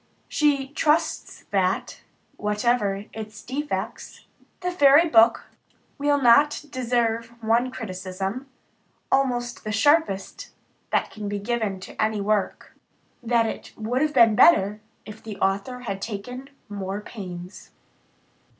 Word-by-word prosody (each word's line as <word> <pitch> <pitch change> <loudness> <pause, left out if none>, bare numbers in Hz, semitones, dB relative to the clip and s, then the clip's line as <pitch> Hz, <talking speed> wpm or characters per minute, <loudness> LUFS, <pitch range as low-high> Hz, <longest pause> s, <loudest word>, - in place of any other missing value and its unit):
She 280 -3 +1
trusts 310 +2 0
that, 190 -1 0 0.3
whatever 210 -1 0
its 215 -1 -8
defects, 290 +4 -5 0.4
the 360 0 -1
Fairy 290 0 +6
Book 230 -5 +5 0.5
will 290 0 +2
not 280 +4 +4
deserve 235 -2 0 0.2
one 230 +3 +2
criticism, 195 +1 -5 0.6
almost 245 -3 0
the 215 - -4
sharpest 220 -3 +1 0.4
that - - 0
can 210 -2 -6
be 205 - -2
given 210 -2 -2
to - - -7
any 215 -1 +1
work 205 0 -1 0.5
"that 235 -1 +2
it 220 - -6
would 235 +4 -1
have 305 0 0
been 225 -2 +6
better 210 - +5 0.2
if 210 - -10
the 215 -3 -8
author 200 +7 -1
had 195 -5 -5
taken 250 +6 -6 0.2
more 200 0 -5
pains." 180 -4 -9
225 Hz, 120 wpm, -24 LUFS, 205-260 Hz, 0.6 s, Fairy